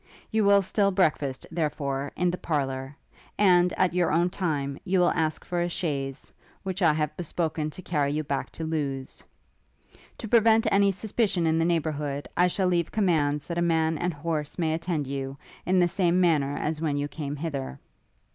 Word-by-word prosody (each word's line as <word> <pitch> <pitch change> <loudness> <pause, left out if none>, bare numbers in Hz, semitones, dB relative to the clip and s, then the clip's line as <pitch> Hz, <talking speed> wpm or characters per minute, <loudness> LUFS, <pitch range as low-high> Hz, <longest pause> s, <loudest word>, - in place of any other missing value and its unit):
You 220 0 +2
will 200 0 +5
still 200 +2 +2
breakfast, 150 -8 0
therefore, 145 -4 -2
in 180 -1 +1
the 180 - -3
parlour; 135 -3 -2 0.4
and, 180 -3 +5
at 185 -2 +1
your 175 -2 +2
own 170 +3 +2
time, 145 -7 -2
you 185 +1 +1
will 175 - +4
ask 155 -2 -1
for 175 -1 -1
a 175 - 0
chaise, 140 -6 -3 0.3
which 190 0 -4
I 165 -3 +5
have 150 -1 -1
bespoken 160 -2 -2
to 185 +4 -9
carry 145 -5 0
you 155 +1 -1
back 140 -1 -3
to 165 - -6
Lewes. 140 -4 -3 0.9
To 225 - -6
prevent 225 0 +4
any 200 0 +4
suspicion 195 -2 0
in 160 0 +2
the 165 - +2
neighbourhood, 150 -4 -1
I 180 +1 +4
shall 185 +1 0
leave 170 -2 +1
commands 150 -8 +1
that 170 0 -3
a - - +1
man 160 -2 +1
and 175 +1 0
horse 150 -1 -3
may 160 -3 +1
attend 165 -2 -2
you, 135 0 -4 0.3
in 185 +1 +3
the 175 -1 +5
same 175 0 +1
manner 150 -6 +2
as 155 0 -2
when 150 -3 0
you 145 0 -1
came 145 -1 -5
hither. 140 - -4
160 Hz, 185 wpm, -26 LUFS, 145-180 Hz, 0.9 s, will